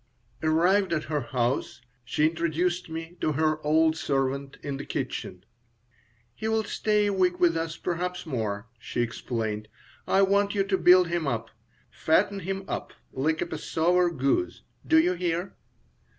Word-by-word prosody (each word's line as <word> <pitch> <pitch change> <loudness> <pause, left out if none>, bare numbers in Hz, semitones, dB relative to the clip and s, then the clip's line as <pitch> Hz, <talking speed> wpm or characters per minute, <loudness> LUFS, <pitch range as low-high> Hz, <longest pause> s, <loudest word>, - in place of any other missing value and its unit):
Arrived 175 +4 +3
at 155 -2 0
her 150 -2 -2
house, 120 +1 -1 0.2
she 150 +5 +1
introduced 170 +2 0
me 165 +2 -6
to 155 - +1
her 155 +1 0
old 160 +1 +3
servant, 135 -2 -1
in 140 -1 -3
the 140 - -6
kitchen 90 -8 -4 0.9
"He'll 220 - -1
stay 210 0 +1
a 205 - +1
week 180 -2 +1
with 170 -2 +4
us, 165 0 -3
perhaps 180 +1 -3
more," 110 -8 -3
she 120 - -3
explained. 110 -3 -3 0.4
"I 195 - +4
want 200 +1 +2
you 195 - +3
to 195 -1 0
build 180 -1 +6
him 170 -3 -1
up. 115 -3 -2 0.4
Fatten 195 +5 +2
him 195 +1 -4
up - - -4 0.2
like 155 +4 0
a - - -4
Passover 175 +3 +1
goose. 155 - -1 0.2
Do 320 - +5
you 185 - +3
hear?" 175 +1 -2
165 Hz, 150 wpm, -27 LUFS, 140-180 Hz, 0.9 s, build